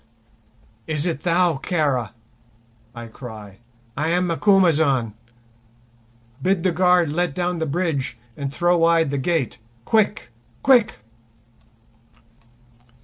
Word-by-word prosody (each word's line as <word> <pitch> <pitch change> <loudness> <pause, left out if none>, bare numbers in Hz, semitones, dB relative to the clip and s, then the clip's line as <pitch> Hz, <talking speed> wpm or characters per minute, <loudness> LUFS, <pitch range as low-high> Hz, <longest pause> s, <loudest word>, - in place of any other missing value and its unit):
"Is 155 0 -1
it 165 -5 -2
thou, 175 -2 +2
Kara?" 135 - -1 0.8
I 120 0 -7
cry; 110 -4 -11 0.4
"I 150 +3 -1
am 180 +2 +1
Macumazahn. 160 - +2 1.3
Bid 185 +2 0
the 185 - +2
guard 180 -2 +3
let 175 -3 -1
down 180 -1 -2
the 160 - -2
bridge 140 -6 -2 0.2
and 140 -1 -5
throw 175 +3 +1
wide 165 -3 +3
the 140 - -1
gate. 150 -3 -1 0.3
Quick, 210 - +1 0.3
quick!" 240 -5 +4
165 Hz, 105 wpm, -22 LUFS, 140-180 Hz, 1.3 s, quick